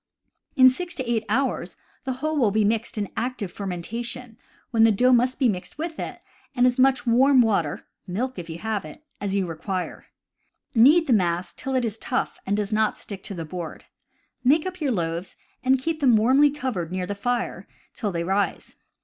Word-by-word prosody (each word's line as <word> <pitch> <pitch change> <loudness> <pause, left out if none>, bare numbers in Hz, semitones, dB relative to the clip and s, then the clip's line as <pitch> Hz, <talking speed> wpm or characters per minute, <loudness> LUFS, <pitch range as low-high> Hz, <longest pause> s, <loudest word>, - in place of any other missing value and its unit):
In 260 -2 +8
six 350 +7 0
to 260 -3 -4
eight 230 -2 +1
hours 265 +5 -1 0.3
the 260 - -1
whole 310 +5 -2
will 250 -8 +3
be 215 +2 +2
in 215 -1 -1
active 220 -4 -3
fermentation, 225 +6 -5 0.4
when 225 -2 +4
the 225 - +6
dough 250 +5 +3
must 250 +1 +3
be 265 - +3
mixed 190 0 -3
with 320 +1 -4
it, - - -5 0.4
and 245 -1 +4
as 250 0 +2
much 265 -1 +4
warm 260 +3 +5
water 200 -10 0 0.2
(milk, 230 +5 -3
if 170 -1 -8
you 160 - -5
have 215 +1 -2
it) 155 - -11 0.2
as 200 -1 -1
you 195 -2 +1
require. 180 +2 -5 0.7
Knead 290 +9 +6
the 260 - +2
mass 175 -3 +1
till 265 0 -4
it 255 -2 +2
is 220 -1 -4
tough 255 - -2
and 200 +1 +1
does 210 0 -2
not 215 0 +2
stick 200 -2 -8
to 195 - -6
the 165 -2 -5
board. 170 0 -7 0.6
Make 300 +6 +4
up 365 -2 -5
your 285 -3 +1
loaves, 170 -2 -3 0.3
and 265 +1 +4
keep 315 +4 -2
them 260 -6 +5
warmly 265 +7 +5
covered 250 - -3
near 185 0 -2
the 205 - -3
fire 245 +4 -2 0.3
till 210 -5 -3
they 170 -1 -2
rise. 195 +3 -1
230 Hz, 195 wpm, -24 LUFS, 195-260 Hz, 0.7 s, In